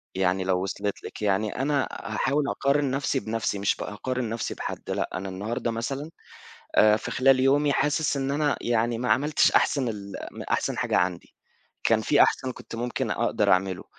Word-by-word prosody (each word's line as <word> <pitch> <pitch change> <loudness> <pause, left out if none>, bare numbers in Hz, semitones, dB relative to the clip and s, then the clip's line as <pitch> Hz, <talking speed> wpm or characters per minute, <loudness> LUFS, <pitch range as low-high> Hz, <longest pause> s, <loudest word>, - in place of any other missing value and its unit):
يعني 95 0 +1
لو 90 -1 0
وصلت 100 +1 -3
لِك، - - -8
يعني 105 +1 0
أنا 140 -1 +1
هاحاول 140 +6 -1
أقارن 140 0 +1
نفْسِي 135 0 0
بنفْسِي، 110 -3 -2
مش 100 - +1
بأقارن 125 +3 -4
نفْسِي 115 0 -3
بحد، - - -6
لأ - - -1
أنا 95 +1 -4
النهارده 110 +5 -3
مثلًا 135 +7 -4 0.7
آآ 105 0 +6
في 110 - -6
خلال 130 0 +4
يومي 140 +2 +3
حاسس 145 +1 +1
إن 135 0 -1
أنا 145 0 +1
يعني 115 0 0
ما 125 +1 -1
عملتش 150 +3 +3
أحسن 135 -4 +2
ال 100 -3 -6 0.2
م - - -7
أحسن - - -1
حاجة - - +1
عندي، 90 -1 -1 0.5
كان 110 -1 +4
في 145 +6 +4
أحسن 130 -1 +1
كنت - - -11
ممكن 120 +1 -2
أقدر - - +1
أعمله، 95 0 0
115 Hz, 175 wpm, -26 LUFS, 100-140 Hz, 0.7 s, آآ